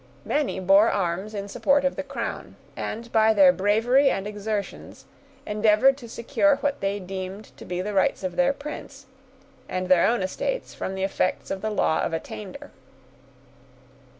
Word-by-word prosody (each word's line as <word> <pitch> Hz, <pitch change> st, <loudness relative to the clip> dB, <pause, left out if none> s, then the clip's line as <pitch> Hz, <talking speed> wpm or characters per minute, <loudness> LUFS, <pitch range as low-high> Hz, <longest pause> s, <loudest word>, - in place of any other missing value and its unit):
Many 290 Hz, -9 st, -1 dB
bore 195 Hz, +4 st, +5 dB
arms 190 Hz, +3 st, -2 dB
in 200 Hz, 0 st, -4 dB
support 280 Hz, +7 st, +2 dB
of 275 Hz, -, +1 dB
the -, -, -3 dB
crown, 270 Hz, -5 st, -6 dB, 0.2 s
and, 230 Hz, +2 st, -5 dB
by 220 Hz, 0 st, +4 dB
their 190 Hz, -3 st, +7 dB
bravery 225 Hz, +9 st, +3 dB
and 195 Hz, -, -2 dB
exertions, 210 Hz, 0 st, -5 dB, 0.4 s
endeavored 215 Hz, +5 st, +4 dB
to 240 Hz, -4 st, -11 dB
secure 280 Hz, +6 st, +2 dB
what 285 Hz, 0 st, -2 dB
they 195 Hz, +1 st, -1 dB
deemed 190 Hz, +2 st, -7 dB
to -, -, -11 dB
be 180 Hz, 0 st, -3 dB
the 205 Hz, +2 st, -4 dB
rights 190 Hz, 0 st, +1 dB
of 185 Hz, -1 st, -3 dB
their 270 Hz, 0 st, +3 dB
prince, 280 Hz, -1 st, -9 dB, 0.6 s
and 185 Hz, 0 st, -3 dB
their 180 Hz, -2 st, +5 dB
own 235 Hz, -4 st, +1 dB
estates -, -, -3 dB
from 190 Hz, -, -5 dB
the 190 Hz, -, -3 dB
effects 195 Hz, -1 st, -1 dB
of 190 Hz, -, -3 dB
the 220 Hz, -, -1 dB
law 160 Hz, -6 st, +1 dB
of -, -, -2 dB
attainder. 210 Hz, -, -7 dB
210 Hz, 165 wpm, -25 LUFS, 190-265 Hz, 0.6 s, their